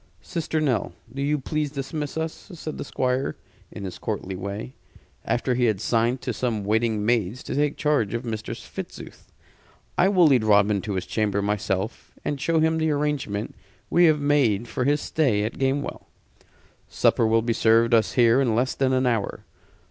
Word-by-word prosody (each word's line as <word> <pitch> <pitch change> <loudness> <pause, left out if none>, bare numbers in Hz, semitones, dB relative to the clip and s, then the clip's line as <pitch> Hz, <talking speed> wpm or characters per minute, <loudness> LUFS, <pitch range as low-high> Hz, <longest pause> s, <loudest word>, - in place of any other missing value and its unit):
"Sister 160 -1 -2
Nell 135 -7 0 0.2
do 140 - -4
you 145 +2 +1
please 150 +2 -2
dismiss 145 +2 -4
us," 160 +4 -5
said 155 -1 -6
the - - -2
Squire, 130 -1 -1 0.4
in - - -8
his 95 - -6
courtly 95 0 -4
way, 100 +6 -5 0.5
after 125 +1 0
he 125 0 +2
had 110 -5 +1
signed 120 +3 +1
to - - -3
some 115 -5 -2
waiting 110 0 +1
maids 115 0 0
to - - -5
take 145 0 0
charge 140 -8 +1
of 120 +2 -4
Mistress 110 -2 -5
Fitzooth. - - -9 0.7
"I 185 - +5
will 185 -4 +5
lead 130 -7 +4
Robin 105 -1 +4
to 105 +1 -4
his 95 - -2
chamber 105 -2 0
myself, 105 0 -2
and 145 -2 -2
show 165 +1 +2
him 160 0 +2
the 160 0 +1
arrangement 145 -8 -1 0.4
we 175 0 +5
have 155 -2 +4
made 135 -7 +2
for 125 +2 -2
his 145 +1 +2
stay 125 -10 +1
at 110 - -4
Gamewell. 135 +1 -1 0.8
Supper 115 - +2
will 115 0 +3
be 115 0 +1
served 115 +1 +3
us 115 -1 +3
here 120 +1 +5
in 120 -5 +1
less 125 +3 +1
than 130 -1 +1
an 130 0 +2
hour. 115 -5 -1
125 Hz, 180 wpm, -24 LUFS, 110-145 Hz, 0.8 s, I